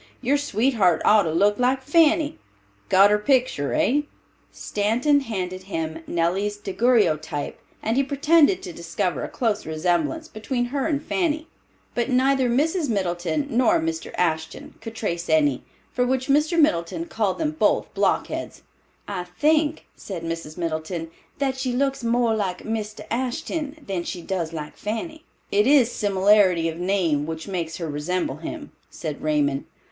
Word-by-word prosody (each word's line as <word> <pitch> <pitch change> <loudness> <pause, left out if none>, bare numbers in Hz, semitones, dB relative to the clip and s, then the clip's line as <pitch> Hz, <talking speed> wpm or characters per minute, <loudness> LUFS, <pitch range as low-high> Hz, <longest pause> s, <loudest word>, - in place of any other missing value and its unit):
Your 265 +3 +1
sweetheart 220 - +2
ought 215 0 +6
to 160 - -1
look 205 +6 +2
like 260 +1 +2
Fanny. 315 +1 +3 0.5
Got 195 +2 +6
her 210 - +3
picter, 245 - +1
hey?" 290 +3 +2 0.4
Stanton 235 +8 +1
handed 185 -7 -4
him 160 -3 -3
Nellie's 190 +5 0
daguerreotype, 190 - 0 0.2
and 225 - 0
he 275 - +4
pretended 300 +5 +3
to 180 - -7
discover 170 -2 -2
a - - -3
close 220 -4 -1
resemblance 175 - -1
between 245 +2 -2
her 280 0 0
and 300 -2 -1
Fanny; 315 -3 0 0.5
but 240 +2 -1
neither 260 0 +3
Mrs. 305 +5 +1
Middleton, 180 - -1
nor 250 +7 +3
Mr. 330 0 -3
Ashton 160 -2 -2
could 225 0 -8
trace 175 -6 -3
any, 150 -4 +3 0.3
for 250 - +1
which 260 +1 -1
Mr. 300 +4 +3
Middleton 170 - +1
called 200 0 -1
them 310 -1 0
both 310 - +1
blockheads. - - -1 0.4
"I 185 -3 -4
think," 305 - +1
said 180 -5 -7
Mrs. 165 -1 -5
Middleton, 165 0 -3 0.3
"that 270 -2 0
she 260 -2 -1
looks 270 0 0
more 235 0 +2
like 195 -4 -2
Mr. 215 -1 -4
Ashton 275 +5 -2
than 190 -3 -2
she 175 0 -6
does 170 -4 -2
like 150 -2 -6
Fanny." 315 - -5 0.3
"It 205 +3 +3
is 265 -4 +5
similarity 195 -4 +3
of 165 +1 -7
name 175 -6 +1
which 160 +2 -5
makes 170 -4 -3
her 170 - -4
resemble 150 0 -2
him," 290 - -7 0.2
said 155 -3 -6
Raymond. 145 -3 0
210 Hz, 150 wpm, -24 LUFS, 170-270 Hz, 0.5 s, ought